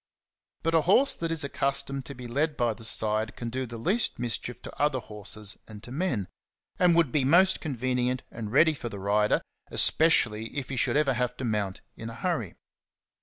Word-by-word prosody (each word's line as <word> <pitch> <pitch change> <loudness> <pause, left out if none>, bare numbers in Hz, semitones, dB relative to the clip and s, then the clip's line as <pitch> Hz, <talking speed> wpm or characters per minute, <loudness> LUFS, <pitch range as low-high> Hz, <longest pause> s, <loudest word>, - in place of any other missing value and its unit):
But 165 0 +1
a 165 - +5
horse 205 - +5
that 165 - -2
is 165 -2 +2
accustomed 140 -1 -1
to 140 - -7
be 125 0 -9
led 150 +6 -1
by 120 -3 +1
the 115 - -13
side 110 0 +1
can 120 -1 -5
do 130 +1 -3
the 115 0 -7
least 200 - +1
mischief 120 0 -3
to - - -9
other 145 -2 +2
horses 105 -2 -6
and 105 -1 -11
to 120 - -10
men, 135 - -1 0.5
and 180 -2 +5
would 165 -6 +3
be 145 0 +2
most 180 +8 +4
convenient 125 -3 -1
and 110 -2 -6
ready 155 +5 +5
for 125 -5 -6
the 105 - -7
rider, 105 +2 +1 0.3
especially 115 -8 +2
if 130 -4 -4
he 135 - -3
should 120 +4 +1
ever 145 -3 +3
have 125 0 -1
to 130 - -4
mount 105 -4 -2
in 115 - -7
a 115 - -8
hurry. 115 - -2
125 Hz, 200 wpm, -27 LUFS, 110-150 Hz, 0.5 s, a